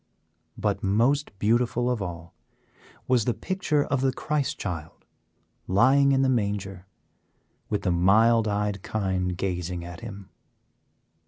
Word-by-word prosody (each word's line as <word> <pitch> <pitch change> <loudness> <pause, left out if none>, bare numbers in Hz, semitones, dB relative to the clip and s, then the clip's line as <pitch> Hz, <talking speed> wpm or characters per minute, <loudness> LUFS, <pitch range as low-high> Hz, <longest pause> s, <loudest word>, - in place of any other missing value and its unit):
But, - - -1
most 120 +9 +2
beautiful 120 +3 +1
of 125 -4 0
all 85 -3 -6 0.7
was 125 -4 +2
the 120 - 0
picture 170 -6 0
of 140 -2 -1
the 135 0 +2
Christ 150 +2 -2
Child 85 -5 -6 0.6
lying 135 +8 +4
in 135 0 +3
the - - +3
manger, 100 -6 -2 0.8
with 105 - -1
the 90 - +1
mild 110 +6 +4
eyed 105 -1 -1
Kine 95 -4 -1
gazing 90 -2 -3
at 85 0 -9
him. 100 -4 -9
105 Hz, 130 wpm, -26 LUFS, 95-125 Hz, 0.8 s, lying